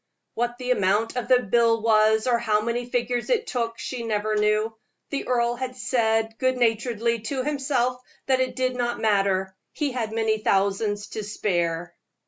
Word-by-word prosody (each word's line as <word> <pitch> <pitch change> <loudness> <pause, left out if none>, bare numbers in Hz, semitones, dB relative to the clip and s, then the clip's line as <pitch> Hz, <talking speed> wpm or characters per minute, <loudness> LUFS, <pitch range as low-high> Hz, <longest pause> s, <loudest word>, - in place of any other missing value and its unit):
What 240 +1 -2
the 250 0 -2
amount 205 +1 +1
of 250 -2 -2
the 250 -1 +5
bill 230 +2 +3
was, 220 -1 +4
or 240 -2 +2
how 215 -3 +1
many 235 +2 -2
figures 245 0 -1
it 465 -2 +2
took, 230 - -2
she 245 +1 -5
never 215 -1 -1
knew. 215 +1 +1 0.4
The 280 - -3
earl 240 -1 +2
had 255 0 -5
said 225 -3 0
good 255 -1 +1
naturedly 230 0 +1
to 255 +4 -3
himself 265 -3 0 0.2
that 260 -1 +2
it 255 -1 -1
did 255 -1 0
not 240 -1 -1
matter 195 -3 +1 0.2
he 295 -3 -1
had 230 -4 -3
many 220 -1 0
thousands 205 +1 0
to 215 - -5
spare. 175 -4 -1
230 Hz, 170 wpm, -25 LUFS, 215-250 Hz, 0.4 s, the